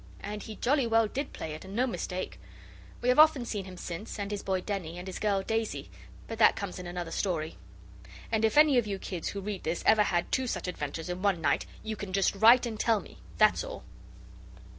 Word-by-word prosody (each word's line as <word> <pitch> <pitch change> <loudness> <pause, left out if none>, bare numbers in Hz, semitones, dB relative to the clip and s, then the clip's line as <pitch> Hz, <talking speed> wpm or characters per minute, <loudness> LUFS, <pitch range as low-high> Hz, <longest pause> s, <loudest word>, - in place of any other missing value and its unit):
And 210 +1 -5
he 220 +1 -8
jolly 265 +1 +1
well 225 -1 +3
did 275 +6 -4
play 155 - -6
it, 155 - -8
and 190 +1 -9
no 250 +3 +3
mistake. 185 -6 -4 0.6
We 245 - +1
have 250 - +4
often 305 -5 +6
seen 205 -4 -4
him 185 -1 -10
since, 175 +6 -6
and 200 0 -4
his 205 - -3
boy 190 -1 -1
Denny, 180 -4 -4
and 180 - -7
his 190 - -6
girl 200 -2 +1
Daisy, 225 +1 -2 0.4
but 225 0 -6
that 220 - +6
comes 200 -3 -5
in 180 - -7
another 175 -1 -5
story. 165 -5 -2 0.7
And 220 -1 +1
if 220 +5 +2
any 300 -4 +7
of 225 - -2
you 200 -1 -2
kids 180 -3 -5
who 200 - -4
read 200 -1 -4
this 165 +2 -2
ever 215 - +6
had 175 -4 0
two 260 -1 +1
such 230 - -3
adventures 160 -1 -4
in 180 +1 -4
one 200 -3 +2
night 165 - +1 0.2
you 220 0 -3
can 200 -2 -7
just 195 0 +2
write 230 +5 +7
and 220 -3 -5
tell 225 -2 +3
me. - - -13 0.2
That's - - +4
all. - - -7
205 Hz, 225 wpm, -29 LUFS, 180-225 Hz, 0.7 s, any